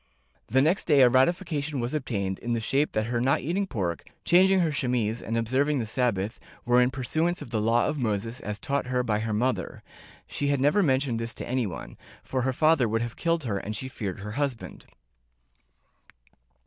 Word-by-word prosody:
The 130 +4 +3
next 170 +7 +2
day 145 -4 +5
a 125 - +7
ratification 150 +1 +1
was 120 +3 -3
obtained 100 -10 -2
in 120 0 -2
the 115 - 0
shape 135 +7 0
that 110 - +1
her 120 +1 -1
not 135 +2 +2
eating 185 +7 -1
pork, 90 - -3 0.2
changing 190 +2 +5
her 165 -3 +1
chemise 120 -5 -1
and 115 +1 -2
observ 130 +6 +1
ing 150 - +1
the 120 - -1
Sabbath, 110 -3 -1 0.3
were 125 +1 +4
in 125 - +3
pursuance 155 +7 -1
of 115 - -9
the 110 - 0
Law 115 +2 +3
of 150 -1 -2
Moses 115 0 -2
as 105 -1 -5
taught 140 -1 -2
her 125 0 0
by 105 -3 0
her 110 0 -2
mother; 110 -3 -1 0.4
she 145 - -3
had 140 -1 +1
never 145 +9 +3
mentioned 130 -7 +1
this 115 0 -5
to - - -6
anyone, 120 -8 -3 0.2
for 130 - -2
her 130 +1 +1
father 150 -3 +3
would 115 +1 0
have 120 0 -5
killed 165 -1 0
her 105 -6 -2
and 105 +2 -5
she 130 +5 -4
feared 100 -7 -5
her 105 +1 -6
husband. 135 -1 -4
125 Hz, 200 wpm, -27 LUFS, 115-145 Hz, 0.4 s, a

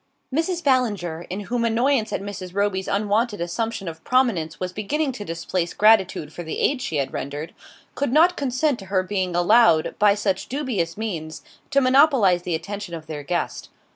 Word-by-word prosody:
Mrs. 335 +3 -1
Ballinger, 205 - 0
in 190 +3 -4
whom 235 +3 -2
annoyance 235 +1 +1
at - - -3
Mrs. 190 -3 -7
Roby's 200 -2 0
unwonted 210 +2 0
assumption 195 +4 -3
of 160 -1 -7
prominence 220 -12 +1
was 185 0 -4
beginning 275 +9 -1
to 245 -5 -7
displace 170 0 -3
gratitude 190 -8 +3
for - - -7
the 160 -2 -5
aid 270 -2 +1
she 165 - -3
had 140 -2 -1
rendered, 145 +4 -5 0.4
could 285 -4 -1
not 335 +6 +5
consent 275 0 0
to 195 - -9
her 190 -1 0
being 185 -2 -2
allowed, 175 -2 +4
by 205 -1 +5
such 195 -2 -2
dubious 240 - -2
means, 165 -8 -5 0.3
to 275 -1 +3
monopolise 255 - +4
the 175 -1 -2
attention 195 +1 -6
of 160 -1 -9
their 155 -1 -6
guest. 175 +4 -3
205 Hz, 175 wpm, -23 LUFS, 175-245 Hz, 0.4 s, not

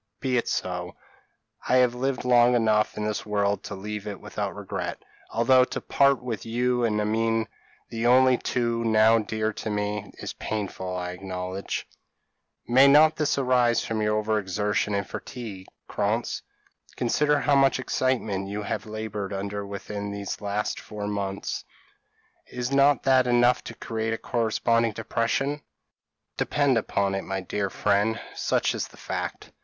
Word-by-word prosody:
Be 130 -2 0
it 120 - +1
so. 90 -1 -3 0.7
I 125 - +4
have 125 -1 +4
lived 130 +1 -2
long 120 0 +5
enough 110 -2 +2
in 105 - -2
this 105 -1 -2
world 100 -1 0
to 100 - -5
leave 105 +1 -6
it 100 -2 -5
without - - -4
regret; - - -4 0.3
although 125 +3 +4
to - - -4
part 140 -2 +2
with 115 -4 -4
you 125 +2 0
and 105 -2 +1
Amine, 110 +1 +1 0.4
the 115 +1 -1
only 130 0 +5
two 115 -1 -1
now 110 0 +5
dear 110 0 -2
to 110 - -5
me, 105 0 -2
is - - -6
painful, 95 -3 -4
I 90 0 -3
acknowledge." 90 +1 -5 0.8
"May 130 +3 +6
not 155 +3 +6
this 150 -2 +1
arise 125 -3 +2
from 110 -1 -2
over 105 0 +1
exertion 105 +1 -1
and 100 0 -1
fatigue, 105 -7 -7 0.2
Krantz? - - -1 0.5
Consider 145 +4 +2
how 145 - +2
much 135 -1 +4
excitement 115 -7 -1
you 105 +1 -4
have 105 - -3
laboured 105 -2 -4
under 100 +1 -4
within 100 +1 -5
these 100 0 -5
last 105 +1 -2
four 105 -1 -7
months. 100 -1 -3 0.8
Is 125 +1 -4
not 140 0 +4
that 130 -1 +4
enough 120 0 +4
to 115 - -7
create 115 0 -3
a - - -2
corresponding 115 -1 +1
depression? 135 +8 -1 0.8
Depend 145 -3 +2
upon 100 -3 0
it, 95 - -1
my 95 0 -3
dear 100 +2 -2
friend, 105 +3 +1
such - - 0
is - - -3
the - - -18
fact." - - -5
110 Hz, 155 wpm, -26 LUFS, 100-125 Hz, 0.8 s, May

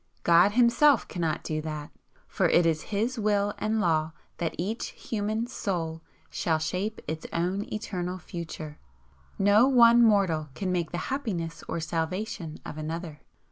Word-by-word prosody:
God 175 +4 +5
Himself 245 +3 +4
cannot 165 -3 -2
do 155 -1 -2
that, 155 -1 -6 0.4
for - - +1
it 175 - +4
is 160 -2 0
His 225 +4 -1
Will 205 -1 +1
and 220 +1 0
Law 160 -4 +1 0.3
that 170 - -2
each 205 +7 -2
human 215 +1 -2
soul 170 -9 -3 0.3
shall 160 -2 0
shape 185 +7 -3
its 160 +1 -4
own 185 +5 -2
eternal 185 -4 -3
future. 160 -3 -7 0.6
No 205 +5 +5
one 240 -3 +7
mortal 190 -9 +3
can 190 -2 -2
make 175 -3 -1
the 175 - -4 0.2
happiness 180 -12 -3
or - - -2
salvation 165 +1 -3
of 155 - -7
another. 160 0 -5
180 Hz, 145 wpm, -27 LUFS, 160-215 Hz, 0.6 s, one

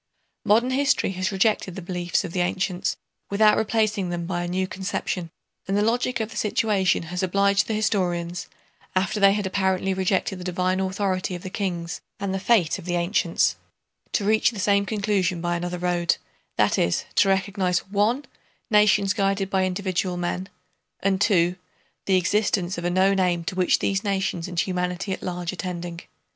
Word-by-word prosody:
Modern 235 +5 +3
history 275 -6 +2
has 185 +1 -2
rejected 195 -2 +1
the 195 - -6
beliefs 175 -1 -1
of 165 - -6
the 185 - -1
ancients 180 0 -1 0.3
without 210 +1 +5
replacing 215 -3 0
them 175 -1 -3
by 175 0 -2
a 175 - -3
new 185 +2 0
conception, 185 -2 -3 0.4
and 195 +1 +1
the 205 - +3
logic 240 +2 +1
of 220 0 -3
the - - -8
situation 205 -4 +1
has 180 +2 -4
obliged 200 +1 +2
the 220 - -1
historians, 180 -5 -1 0.5
after 195 +3 +1
they 195 -1 +6
had 205 -1 -1
apparently 190 0 0
rejected 190 0 0
the - - -7
divine 185 +1 0
authority 190 -1 -1
of 175 - -8
the 185 - -6
kings 180 -4 -3 0.2
and 195 -1 -2
the 195 - -1
"fate" 190 -6 +2
of - - -11
the 175 -1 -1
ancients, 170 - +1 0.6
to 200 - +1
reach 215 +1 +4
the 235 - -9
same 200 +1 +2
conclusion 200 -5 0
by 175 0 -1
another 175 +1 -3
road, 175 -1 +1 0.4
that - - +3
is, 85 - +1
to 195 - +4
recognize 190 -1 0
(1) 220 +7 +1 0.5
nations 205 -2 +4
guided 195 -1 0
by 190 -1 +2
individual 185 -1 -1
men, 180 +2 -3 0.5
and 195 -1 +1
(2) 180 -4 +3 0.5
the 190 -1 +4
existence 190 0 +1
of 170 - -5
a - - +2
known 190 +2 +3
aim 175 -2 +1
to 180 - -4
which 185 -1 +3
these 195 +1 -1
nations 190 -4 -1
and 175 -2 0
humanity 180 +1 -2
at - - -6
large 175 0 -3
are - - -8
tending. 175 -2 -5
190 Hz, 180 wpm, -24 LUFS, 180-200 Hz, 0.6 s, they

